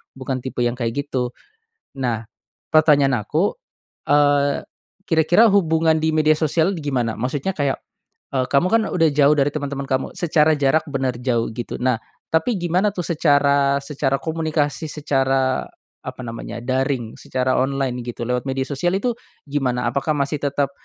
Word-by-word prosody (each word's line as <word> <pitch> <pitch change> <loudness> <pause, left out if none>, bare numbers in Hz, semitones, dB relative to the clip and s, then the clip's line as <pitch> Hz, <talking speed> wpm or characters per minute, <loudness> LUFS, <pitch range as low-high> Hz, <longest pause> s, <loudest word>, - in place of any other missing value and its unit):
bukan 130 -1 -4
tipe 130 -1 -5
yang 120 0 0
kayak, 115 -2 -2 0.2
gitu. 125 -3 -2 0.7
Nah, 120 -4 -2 0.4
pertanyaan 145 -6 +4
aku, - - 0 0.5
eee, 145 0 +3 0.4
kira-kira 175 +6 +5
hubungan 160 -4 +3
di 160 0 +1
media 155 0 +4
sosial 165 +4 +1
gimana? 130 -7 -1
Maksudnya 135 +9 -2
kayak, 140 -2 0 0.6
eee, 130 -1 +1
kamu 140 +6 +3
kan 225 - +4
udah 165 -2 +3
jauh 145 +1 +5
dari 140 0 +2
teman-teman 140 -2 -4
kamu, 130 0 0
secara 155 -2 +3
jarak 145 +3 +2
benar 130 -3 -1
jauh, 120 -2 0
gitu. 120 - -5
Nah, 125 -3 +1 0.3
tapi 160 +8 +2
gimana 175 +4 +1
tuh, 180 -4 -3
secara 140 -3 +3
secara 135 -2 0
komunikasi, 160 -2 -1
secara, 135 -3 0 0.4
apa - - -7
namanya, 115 0 -6
daring, 130 -2 -1
secara 130 0 0
online, 135 -2 -1
gitu, 120 0 -5
lewat 125 0 -1
media 130 0 -1
sosial 175 +6 0
itu, 245 +3 0 0.4
gimana, 125 -4 -1
apakah 140 +5 0
masih 140 +2 -1
tetap 140 -1 0
140 Hz, 150 wpm, -21 LUFS, 130-155 Hz, 0.7 s, kira-kira